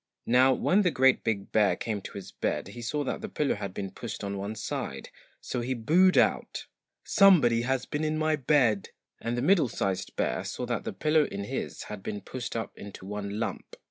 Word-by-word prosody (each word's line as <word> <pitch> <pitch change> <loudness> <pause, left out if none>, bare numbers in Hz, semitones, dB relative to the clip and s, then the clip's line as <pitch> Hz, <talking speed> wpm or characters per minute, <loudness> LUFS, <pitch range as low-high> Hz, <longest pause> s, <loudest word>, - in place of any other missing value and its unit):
Now 130 +2 +5
when 180 +9 +3
the 185 - +3
GREAT 130 -4 +3
BIG 105 -4 -2
BEAR 105 -2 +3
came 105 -3 -3
to - - -9
his 100 -1 -8
bed 75 -1 -2
he 120 +4 -9
saw 145 +5 -1
that 130 - -3
the - - -5
pillow 150 -2 0
had 100 -2 -5
been 95 0 -5
pushed 115 +2 -7
on 100 0 -3
one 100 +2 -4
side, - - -5 0.3
so 125 - -3
he 130 +2 -2
boohed 175 +11 +4
out - - +1 0.4
'SOMEBODY 150 - +5
HAS 130 +1 -1
BEEN 145 +1 -3
IN 155 0 0
MY 155 0 +2
BED!' 125 -7 +2 0.3
and 120 +1 -2
the 120 - -1
MIDDLE 170 -2 +4
SIZED 95 -3 -2
BEAR - - -1
saw - - -4
that - - -3
the - - -3
pillow 155 0 +3
in 100 0 -5
his 100 - -4
had 105 -2 -7
been 105 +1 -4
pushed 120 +2 -6
up 115 -2 -4
into 100 -2 -10
one 100 +1 -4
lump. 115 - -4
120 Hz, 210 wpm, -28 LUFS, 100-145 Hz, 0.4 s, Now